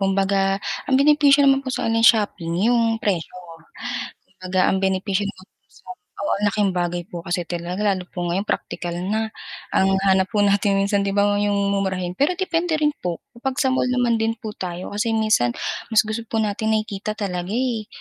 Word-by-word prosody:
kumbaga, 195 0 +1 0.3
ang 265 - +4
benepisyo 285 0 +5
naman 270 0 +5
po 270 - -7
sa 260 - -2
online 225 0 +1
shopping 200 -6 +3
yung 230 -1 +2
presyo. 195 -7 -1 1.0
Kumbaga, 185 0 -1
ang 190 0 +1
benepisyo 190 +1 0
naman 200 -2 -7
po - - -55 0.7
oo, - - +1
ng 210 - 0
laking 205 -1 +1
bagay 175 -1 -2
po 175 - -5
kasi 175 0 -1
talaga, 175 +3 -4
lalo 190 -3 0
po 175 - -4
ngayon 190 +4 -1
praktikal 175 -1 -3
na. 210 +5 -1 0.5
Ang 190 0 +3
hanap 190 +1 +3
po 215 - 0
natin 200 0 +3
minsan, 200 0 +1
'di 200 - -1
ba, 200 - +4 0.2
yung 205 -1 +1
mumurahin, 185 -2 -1
pero 285 - +2
depende 350 -3 0
rin 300 -1 +3
po, 175 -2 -2 0.2
kapag 260 +2 -3
sa 265 - +2
mall 260 - +1
naman 245 -2 +2
din 225 0 +1
po 215 - -6
tayo 180 0 -5
kasi 225 +2 0
minsan, 215 - +2 0.4
mas 220 - +5
gusto 220 +2 -3
po 225 - -1
natin 220 +1 0
nakikita 215 -1 -3
talaga, 180 -3 -3
eh, 235 -2 -1
200 Hz, 185 wpm, -22 LUFS, 185-225 Hz, 1.0 s, benepisyo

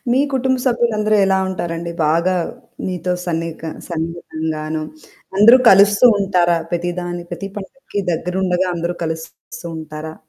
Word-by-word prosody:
మీ 260 - +4
కుటుంబ 260 0 +1
సభ్యులందరూ 230 -4 +2
ఎలా 190 0 +3
ఉంటారండి? 170 -2 -4 0.2
బాగా 170 +4 +2 0.5
మీతో 180 -1 -2
సన్నిక 165 -1 -3 0.3
సన్నిహితంగాను 160 -2 -4 0.5
అందరూ 230 +6 +8
కలుస్తూ 205 +4 +6
ఉంటారా? 180 -3 +2
ప్రతిదాన్ని 175 0 -3
ప్రతి 195 - -5
పండగకి 205 +1 -6
దగ్గరుండగా, 180 +2 0
అందరూ 170 +1 -3
కలుస్తూ 160 +1 -7
ఉంటారా? 155 0 -7
175 Hz, 110 wpm, -19 LUFS, 165-200 Hz, 0.5 s, అందరూ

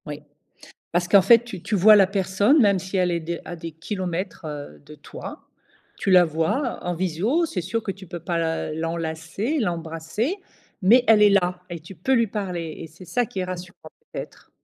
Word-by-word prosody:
Oui, 150 0 -7 0.7
parce 175 +1 0
qu'en 200 +2 +6
fait, 230 +4 +6
tu 205 -7 -8
tu 210 - -1
vois 210 +3 +7
la 195 -2 +6
personne 200 - +2
même 200 -4 +4
si 190 +2 -4
elle 180 -1 +2
est 170 - 0
à - - -3
des 170 0 -3
à 175 - -6
des 165 0 -7
kilomètres, 180 +1 -5
heu, 145 - -7
de - - -12
toi, - - -10 0.5
tu 195 - -1
la 180 -1 +8
vois 185 - -1
en 175 - -1
visio. 190 - 0
C'est 320 - -3
sûr 195 +7 -2
que 205 - -3
tu 195 0 -12
peux 175 0 -6
pas 170 +1 -2
la 160 -2 -2
l'enlacer, 165 - -3
l'embrasser 170 - -2 0.4
mais 235 +7 +6
elle 215 -1 +6
est 210 - +7
là 180 -2 +1
et 170 -2 -6
tu 170 +4 -11
peux 185 +10 -1
lui 230 -3 +3
parler 180 -6 -4
et 165 - -7
c'est 165 +4 -15
ça 235 +9 0
qui 195 - -6
est - - 0
rassurant 180 -2 -8 0.2
peut-être. - - -8
180 Hz, 210 wpm, -23 LUFS, 165-205 Hz, 0.7 s, la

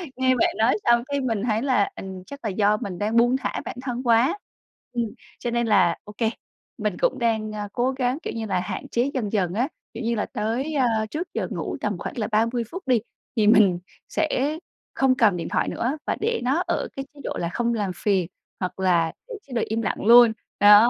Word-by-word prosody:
nghe 260 0 +3
bạn 240 - +3
nói 225 +3 +4
xong 235 0 +4
cái 280 0 -2
mình 225 -5 -1
thấy 220 -2 +1
là 255 -6 +2
ình 190 -1 -7
chắc 280 - -8
là 215 - -1
do 205 +2 +2
mình 190 -4 -5
đang 215 +2 -1
buông 240 +2 +4
thả - - -3
bản - - -5
thân 250 -1 -3
quá, 245 - +3 0.6
ừm, 235 -1 0 0.3
cho 240 - -2
nên 235 0 +1
là 185 -6 +4
ô 210 - -11
kê, 225 -2 +2 0.5
mình - - -2
cũng - - +2
đang, 220 -2 0
a, 210 -1 -4
cố 250 +2 +1
gắng, 260 0 0
kiểu - - -4
như 225 -1 -3
là, 185 -4 0
hạn 180 - -5
chế 245 +4 +1
dần 220 -7 -2
dần 185 -5 +1
á, 240 +6 +1 0.3
kiểu 230 - -6
như 235 +1 0
là, 210 - -1
tới, 235 +8 -2
ơ, 230 -5 +2
trước 340 +4 -3
giờ - - -1
ngủ - - -3
tầm - - -1
khoảng - - -6
là 215 - -1
30 230 +3 +2
phút 370 +2 -6
đi, 245 -3 +4 0.4
thì 215 -2 +3
mình 200 -5 +6 0.3
sẽ 305 -1 0 0.4
không 265 -1 +3
cầm 215 -8 +4
điện 165 - -4
thoại - - +1
nữa 255 +6 -1
và - - 0
để 465 +2 0
nó 275 +8 +1
ở - - 0
cái 270 0 -4
chế 290 - -16
độ - - -3
là 170 - -1
không 235 +5 0
làm 205 -4 -1
phiền 190 -5 +1 0.3
hoặc 185 0 -4
là 170 -3 +3 0.2
để - - -6
chế 265 - -10
độ 235 - +1
im 225 +1 -1
lặng 200 - -2
luôn, 235 0 +9 0.3
đó. 210 +3 +8
230 Hz, 235 wpm, -24 LUFS, 210-255 Hz, 0.6 s, luôn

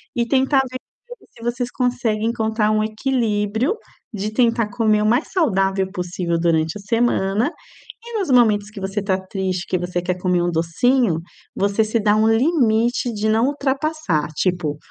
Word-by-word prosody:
e 235 -1 0
tentar 265 +1 +3
ver 255 - -5
com - - -16
ele - - -21
se 230 - -15
vocês 240 +1 -2
conseguem 235 -4 -1
encontrar 220 -2 0
um 215 0 +2
equilíbrio 220 - 0 0.4
de 210 +1 -3
tentar 230 -2 +2
comer 215 -3 +2
o - - +1
mais 240 +7 +1
saudável 195 - +1
possível 180 -2 -2
durante 165 +1 +1
a - - -10
semana 220 +2 +1 0.5
e 470 -1 -5
nos 380 - -2
momentos 215 -5 +4
que 205 - -9
você 195 +2 -2
tá 190 -1 0
triste, 190 -2 -3
que 185 - 0
você 180 0 -3
quer 180 +1 -1
comer 180 -1 +1
um 175 0 0
docinho, 170 +4 +1 0.4
você 200 +2 +1
se 215 +2 0
dá 210 0 +3
um 215 +1 +3
limite 240 -2 +2
de 215 0 -1
não 225 +4 +3
ultrapassar 280 - -1
tipo: 175 -6 -1
215 Hz, 175 wpm, -20 LUFS, 190-245 Hz, 0.5 s, momentos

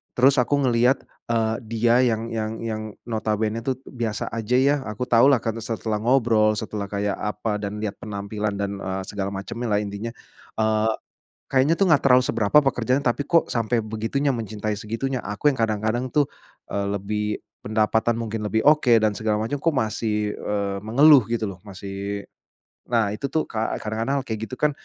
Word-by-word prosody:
Terus 135 +2 +5
aku 140 +3 +1
ngelihat, 125 +2 +3 0.3
eee, 110 -1 +1
dia 115 +2 +2
yang 115 -1 0
yang 110 -1 -2
yang, 110 -1 -3 0.2
notabene 110 -1 -1
tu 135 - +1 0.2
biasa 115 -4 -3
aja 115 +1 -1
ya, 140 +2 +4
aku 105 +3 -4
tahulah 120 +2 +5
karena 115 0 -2
setelah 110 -1 -2
ngobrol, 115 -3 +3
setelah 105 -2 -4
kayak 100 0 -1
apa 105 0 -2
dan 105 +1 -4
lihat 105 -2 -3
penampilan 105 0 -3
dan, 100 0 -2
eee, 95 +1 -3
segala 100 -1 -3
macemnya 115 +5 -5
lah, 105 - +3
intinya, 105 +3 -5 0.5
eee, 110 0 +2 0.6
kayaknya 135 +5 +4
tuh 195 - +4
gak - - +1
terlalu 125 -1 +6
seberapa 110 +6 +3
pekerjaan 130 +1 +1
tapi 120 +4 +1
kok 170 0 +3
sampai 115 0 0
begitunya, 115 +6 -1
mencintai 110 -2 -3
segitunya, 115 +5 -3
aku 105 +8 -4
yang 130 - -7
kadang-kadang 110 +3 0
tuh, 145 -2 +3 0.4
eee, 100 0 -1
lebih 105 +2 -2 0.4
pendapatan 110 +2 +1
mungkin 110 -1 -3
lebih, 110 +1 +1
oke, 150 -4 +5
dan 110 -1 +3
segala 110 -1 0
macam 115 +6 -2
kok 165 0 +2
masih, 105 -3 -1
eee, 100 -1 -2
mengeluh 135 +2 +6
gitu 115 -3 -1
loh, 95 - -10
masih 100 +1 -5 0.7
nah 115 -4 +2
itu 105 - -4
tuh 155 +3 +1
ka 110 0 -2
kadang-kadang 115 +6 -1
kayak 110 -3 -3
gitu 130 - -5
kan, 150 0 +3
110 Hz, 170 wpm, -24 LUFS, 105-120 Hz, 0.7 s, terlalu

